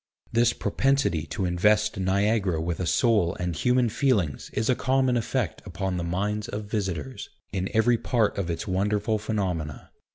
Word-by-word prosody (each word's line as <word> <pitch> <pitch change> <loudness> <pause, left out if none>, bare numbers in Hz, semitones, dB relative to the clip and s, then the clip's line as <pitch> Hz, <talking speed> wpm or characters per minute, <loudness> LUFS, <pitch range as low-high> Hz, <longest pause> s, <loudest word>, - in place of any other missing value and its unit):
This 120 0 +4
propensity 120 - 0
to 95 - -2
invest 105 +4 +2
Niagara 100 -1 +1
with 85 +1 -2
a 90 - -1
soul 105 -7 +2
and 90 -2 -3
human 125 +7 +2
feelings 105 - 0
is 110 - 0
a 125 - +4
common 130 0 +1
effect 120 -1 -1
upon 95 -1 -3
the 85 - -2
minds 105 +5 -2
of 105 +1 -5
visitors, 105 +4 -4 0.2
in 95 -1 -1
every 115 +1 +3
part 115 -5 +1
of 90 -3 -2
its 85 +5 -3
wonderful 105 +3 0
phenomena. 90 -9 -3
105 Hz, 160 wpm, -26 LUFS, 90-115 Hz, 0.2 s, This